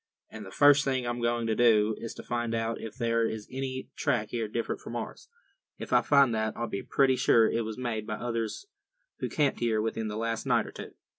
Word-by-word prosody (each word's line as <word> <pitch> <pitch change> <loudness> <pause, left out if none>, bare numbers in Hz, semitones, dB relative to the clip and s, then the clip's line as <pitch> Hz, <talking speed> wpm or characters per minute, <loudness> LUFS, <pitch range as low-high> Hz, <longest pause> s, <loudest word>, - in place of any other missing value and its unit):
And 110 - -8
the 95 - -9
first 145 +6 +5
thing 130 -2 -1
I'm 120 0 -3
going 120 0 0
to 110 - +1
do 110 -2 +4
is 115 - -6
to - - -9
find 120 -1 -2
out 115 0 -2
if 110 -1 -7
there 115 -2 +1
is 110 -2 -3
any 130 0 -5
track 125 -8 0
here 115 -2 -2
different 115 +2 -3
from - - -7
ours. - - -6 0.5
If - - -6
I - - +6
find 140 -4 +4
that, 110 0 -1
I'll 120 - -1
be 100 -3 -4
pretty 135 -2 +2
sure 115 -3 +4
it 115 - 0
was 110 -1 -5
made 115 -4 -3
by 110 - -2
others 115 - -3 0.5
who - - -2
camped 145 -3 +1
here 115 -2 +1
within 110 0 -2
the 105 0 -4
last 115 0 -2
night - - +3
or - - -9
two." - - -9
115 Hz, 230 wpm, -29 LUFS, 110-125 Hz, 0.5 s, I